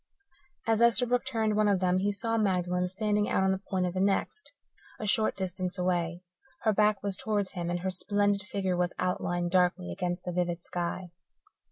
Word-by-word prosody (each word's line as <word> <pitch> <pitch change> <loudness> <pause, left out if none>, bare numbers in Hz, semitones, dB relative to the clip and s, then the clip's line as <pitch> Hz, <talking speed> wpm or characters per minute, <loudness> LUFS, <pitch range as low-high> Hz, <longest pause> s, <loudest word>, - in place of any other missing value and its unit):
As 225 0 +2
Esterbrook 245 +1 +3
turned 220 -4 0
one 215 0 +3
of 200 -2 +3
them 185 0 +2
he 200 +2 +1
saw 225 +3 -1
Magdalen 180 -4 +1
standing 210 +1 0
out - - +2
on 190 - +3
the 190 0 -2
point 185 -2 +1
of 180 - -2
the 185 - -2
next, 200 - 0 0.5
a 215 - -4
short 215 +1 +2
distance 185 0 -3
away. 175 -1 -1 0.4
Her 220 - +3
back 210 0 +2
was 200 -2 -1
towards 205 -1 -1
him, 175 -2 -4
and 175 0 -2
her 190 +1 -1
splendid 205 +2 +1
figure 190 -2 -2
was 175 0 0
outlined 175 -1 -1
darkly 180 - +2
against 175 - -3
the 180 - -4
vivid 175 -1 -1
sky. 175 0 -4
190 Hz, 190 wpm, -29 LUFS, 180-210 Hz, 0.5 s, Esterbrook